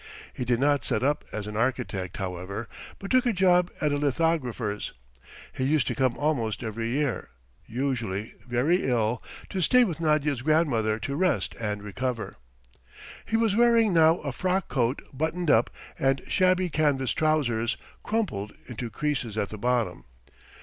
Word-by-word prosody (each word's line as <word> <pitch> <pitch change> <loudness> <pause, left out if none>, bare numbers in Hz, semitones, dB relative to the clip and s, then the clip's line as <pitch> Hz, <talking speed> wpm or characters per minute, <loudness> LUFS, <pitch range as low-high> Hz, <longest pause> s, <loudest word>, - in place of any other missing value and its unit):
He 125 - -4
did 120 -1 +1
not 145 +1 +2
set 120 -2 0
up 145 +2 +1
as 105 -1 -4
an 105 0 -6
architect, 115 -6 -1
however, 95 +4 -4 0.3
but 195 - -7
took 255 -1 +4
a 240 - +2
job 180 -2 +4
at 150 - +1
a 145 - +1
lithographer's. 135 -8 -1 0.6
He 130 - -3
used 145 0 +2
to - - 0
come 130 -3 +1
almost 125 -8 -1
every 115 +1 -3
year, 135 0 -1 0.4
usually 115 -5 -2
very 135 +7 +2
ill, 115 -1 +1 0.3
to 190 - -1
stay 250 +8 +5
with 170 -7 -2
Nadya's 150 -4 +1
grandmother 125 -8 +2
to 140 +6 -4
rest 185 +4 +1
and 105 -2 -2
recover. 120 +3 -3 0.9
He 225 - +1
was 225 -3 +2
wearing 230 -3 +4
now 165 0 +5
a 140 - -3
frock 185 +6 -1
coat 125 0 0
buttoned 160 +4 0
up, 110 - +4 0.3
and 135 0 +1
shabby 185 -1 +2
canvas 140 -4 +1
trousers, 130 -8 +1 0.2
crumpled 180 - -2
into 120 -1 -5
creases 125 -3 -2
at 100 - 0
the 110 - -7
bottom. 115 - 0
135 Hz, 155 wpm, -27 LUFS, 115-160 Hz, 0.9 s, stay